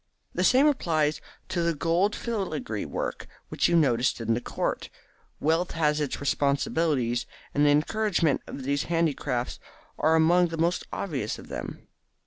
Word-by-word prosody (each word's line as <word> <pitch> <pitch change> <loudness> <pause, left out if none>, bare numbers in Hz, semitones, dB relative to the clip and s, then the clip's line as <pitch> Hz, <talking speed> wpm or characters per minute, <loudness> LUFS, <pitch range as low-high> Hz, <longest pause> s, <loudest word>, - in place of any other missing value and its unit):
The 180 - 0
same 255 +8 +5
applies 160 - +1 0.3
to 180 -2 -1
the 170 -1 +1
gold 170 +7 +1
filigree 155 - -3
work - - -4 0.2
which - - +2
you 175 - +2
noticed 130 -7 +2
in 115 0 0
the 120 - -1
court. - - -3 0.5
Wealth 165 +4 +1
has 150 -2 +1
its 145 - -2
responsibilities, 140 -2 0 0.3
and 145 +1 +3
the - - +6
encouragement 165 +1 +2
of 135 - -7
these 140 +2 0
handicrafts 155 -7 -1 0.4
are 160 +1 +4
among 175 +2 +4
the 165 -1 -5
most 170 +2 0
obvious 135 - -3
of - - -12
them. - - -7
155 Hz, 150 wpm, -27 LUFS, 140-175 Hz, 0.5 s, the